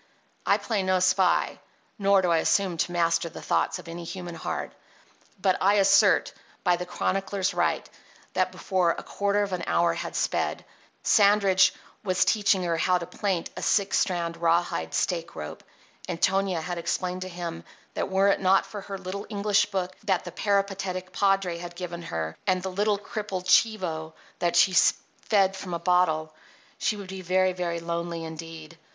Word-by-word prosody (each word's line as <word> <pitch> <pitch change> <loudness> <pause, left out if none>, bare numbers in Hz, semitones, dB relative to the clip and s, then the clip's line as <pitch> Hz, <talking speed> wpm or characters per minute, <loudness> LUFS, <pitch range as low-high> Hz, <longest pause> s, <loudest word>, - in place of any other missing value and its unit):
I - - +5
play 220 -4 -1
no 185 0 +2
spy; 185 0 +2 0.4
nor 195 -1 +4
do 175 - +2
I 165 - +4
assume 190 +1 +1
to 175 - 0
master 170 -1 +1
the - - -10
thoughts - - 0
of - - -12
any 170 +1 -7
human 175 0 -6
heart; 165 - -4 0.7
but 185 -1 +1
I 200 +2 +4
assert, 195 -1 +4 0.3
by 180 - +3
the 180 +1 -6
chronicler's 195 +1 -1
right, - - 0 0.5
that - - +1
before 185 -3 0
a - - -6
quarter 200 0 0
of 195 -2 -4
an 175 -1 -2
hour 170 0 +2
had 170 - -5
sped, - - -1 0.4
Sandridge 200 -2 +5 0.3
was 185 -2 +2
teaching 200 -3 +2
her 170 -1 0
how 180 +2 +2
to 175 - -5
plaint 190 -1 -2
a - - -6
six 200 -2 +2
strand 170 -3 -1
rawhide 165 - 0
stake 170 -2 -1
rope, 75 - -7 0.4
and 175 -2 -4
Tonia 190 -3 +1
had 175 +1 -4
explained 180 +2 -2
to 185 - -5
him 170 - -6 0.3
that - - -2
were 195 +1 +3
it 195 - +1
not 190 +1 +4
for 205 - -7
her 195 0 -6
little 195 +2 -6
English 205 -1 +2
book 185 -2 -3
that 190 -4 +1
the 175 - -6
peripatetic 195 -1 -1
padre 195 -4 +1
had 175 0 -8
given 175 -1 -6
her 80 - -4
and 185 -1 +1
the 190 - -3
little 205 +2 +1
crippled 200 -2 -5
chivo, 180 -7 +2 0.3
that 175 -1 0
she 190 - +5
fed 195 0 +2
from 185 -2 -5
a - - 0
bottle, 165 -3 +1 0.5
she 210 - 0
would 200 -2 -8
be 190 0 -6
very, 185 +1 +2
very 175 -2 -2
lonely 170 0 -4
indeed. 160 0 -9
185 Hz, 175 wpm, -26 LUFS, 170-195 Hz, 0.7 s, I